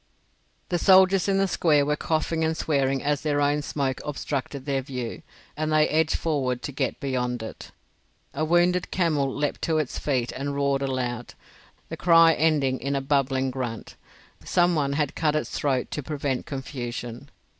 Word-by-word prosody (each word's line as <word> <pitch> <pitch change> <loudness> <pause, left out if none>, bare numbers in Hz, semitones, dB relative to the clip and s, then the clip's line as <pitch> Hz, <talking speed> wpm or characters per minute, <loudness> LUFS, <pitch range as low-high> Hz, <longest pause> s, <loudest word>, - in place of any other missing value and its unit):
The 175 - 0
soldiers 190 0 +5
in 195 -1 +2
the 195 0 +2
square 150 -5 +3
were 150 +1 +1
coughing 160 +1 -1
and 160 0 0
swearing 135 -3 0
as 145 -1 0
their 145 -2 0
own 145 +1 +2
smoke 135 -3 -2
obstructed 140 -1 -4
their 135 -2 0
view, 125 -3 -5 0.3
and 155 +1 -2
they 155 0 +4
edged 160 0 +1
forward 130 -6 -1
to - - -4
get 135 - -2
beyond 125 -3 -2
it. 110 - -9 0.6
A 155 - -2
wounded 175 +2 +2
camel 155 -7 +1
leaped 145 +2 -2
to 160 -1 +1
its 150 -5 -2
feet 130 -5 -1
and 140 +1 -4
roared 140 -1 +1
aloud, 125 -3 -3 0.5
the - - -5
cry 165 -1 +6
ending 145 -5 +1
in 140 +2 -2
a - - +1
bubbling 135 -1 0
grunt. 120 -4 -5 0.5
Some 175 0 +2
one 140 -3 0
had 145 0 0
cut 155 -2 0
its 155 - -2
throat 135 -3 -1
to 150 - -3
prevent 140 -2 -3
confusion. 120 -2 -6
145 Hz, 170 wpm, -25 LUFS, 130-155 Hz, 0.6 s, cry